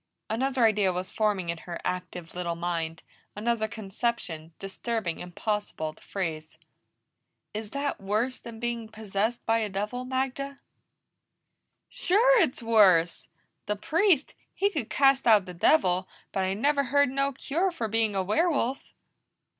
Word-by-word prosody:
Another 255 +1 +2
idea 210 -3 +3
was 180 +1 -4
forming 205 -5 0
in 170 -1 -2
her 170 0 -7
active 180 -2 -4
little 175 -1 -2
mind, 165 -1 -3 0.3
another 220 +1 0
conception, 200 -6 -3
disturbing, 195 -2 -3
impossible 180 -3 -3
to - - -22
phrase. 160 -5 -4 1.0
"Is 215 0 -5
that 280 0 -3
worse 215 +6 0
than 230 -1 -10
being 235 -1 -3
possessed 220 +2 -2
by 225 0 +3
a 215 -2 -1
devil, 210 +6 -3
Magda?" 265 +2 -2 1.3
"Sure 465 +5 +4
it's 260 -7 0
worse! 190 -7 +4 0.4
The 210 - 0
Priest, 320 - +2 0.2
he 400 +1 +2
could 295 - -3
cast 270 -2 +4
out 210 -4 +6
the 180 - -8
devil, 185 - +3 0.2
but 190 -1 0
I 190 +1 0
never 280 +5 +2
heard 285 +2 +3
no 275 +1 0
cure 310 +8 -1
for 295 -10 -3
being 220 -1 +1
a 190 - +1
werewolf." 270 - +1
220 Hz, 140 wpm, -28 LUFS, 185-265 Hz, 1.3 s, out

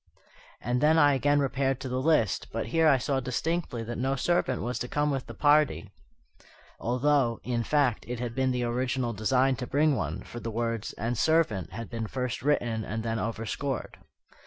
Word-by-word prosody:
And 125 +1 -1
then 155 +2 +5
I 145 -2 +6
again 145 +2 +2
repaired 135 -1 0
to 130 - -4
the 130 0 -2
list, 135 - +2
but - - -3
here 160 +4 +3
I 140 -3 +6
saw 135 +1 -1
distinctly 130 0 -2
that 120 +1 -5
no 135 +2 0
servant 135 -2 0
was 125 +2 -2
to 125 - -3
come 145 +3 0
with 135 -2 -3
the - - -9
party: 145 -8 +3 0.9
although, 125 -1 +1
in 120 -2 -1
fact, 140 -4 +1
it 120 0 -4
had 120 -1 -3
been 130 +1 +1
the 125 -1 0
original 125 0 -1
design 130 +5 +2
to 125 - -5
bring 150 +1 +2
one, 80 - -3
for 120 - -8
the 115 - -5
words 115 -1 -2
"and 115 +3 -2
servant" 135 - +1
had 115 -1 -7
been 115 -2 -3
first 125 +1 -3
written 120 -6 0
and 110 +1 -4
then 115 -1 -1
overscored. 115 +5 -3
125 Hz, 190 wpm, -28 LUFS, 115-140 Hz, 0.9 s, I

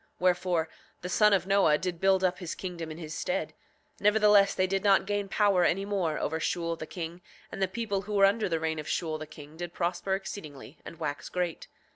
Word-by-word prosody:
7:19 - - -35
Wherefore, 180 -2 +1 0.3
the 180 - -4
son 210 +3 +4
of 195 -2 +3
Noah 195 -6 +4
did 180 -1 -4
build 190 -1 +3
up 180 0 +1
his 175 -4 -5
kingdom 175 -3 -6
in 155 - -7
his 155 -2 -7
stead; 270 - -2 0.5
nevertheless 210 -1 +5
they 185 - +2
did 195 +1 -1
not 195 -2 +4
gain 205 0 -2
power 200 -3 +3
any 195 +3 +1
more 185 -7 -1
over 160 +2 -2
Shule 170 +1 -1
the 155 - -8
king, 170 0 -6 0.3
and - - -6
the 190 - +3
people 200 0 -2
who 210 +1 -5
were 195 -1 +6
under 205 +1 +2
the 165 -1 0
reign 160 0 -2
of 150 - -7
Shule 160 -3 -2
the 155 - -7
king 155 0 -12
did 175 0 -6
prosper 180 +2 -1
exceedingly 155 -7 -8
and 165 - -10
wax 145 -3 -4
great. 180 -2 -3
180 Hz, 220 wpm, -29 LUFS, 160-195 Hz, 0.5 s, were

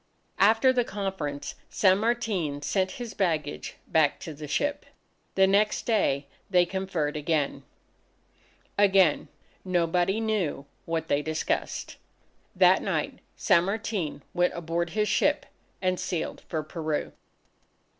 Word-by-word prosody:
After 225 +6 +5
the 245 -1 +2
conference, 190 -10 -4 0.2
San 190 -1 +4
Martin 205 -11 -1
sent 190 +2 0
his 240 -3 -6
baggage 155 -6 -1
back 155 -2 +2
to 160 - -6
the 150 +1 -8
ship. 290 - -1 0.5
The 190 - +6
next 205 +2 +2
day, 150 - +1 0.2
they 180 -2 +4
conferred 175 -5 -2
again. 150 -2 0 1.2
Again, 190 -6 +4 0.4
nobody 180 +2 +1
knew 210 -11 -1 0.2
what 165 -1 -2
they 145 - +2
discussed. 155 +1 -2 0.6
That - - +5
night, - - -2 0.2
San 175 -4 +3
Martin 195 -7 -3
went 180 0 +1
aboard 170 0 -2
his 210 0 +2
ship, - - +2 0.4
and 185 -1 +1
sailed 170 -3 -3
for 155 -2 -2
Peru. 155 -1 -3
180 Hz, 120 wpm, -27 LUFS, 155-200 Hz, 1.2 s, The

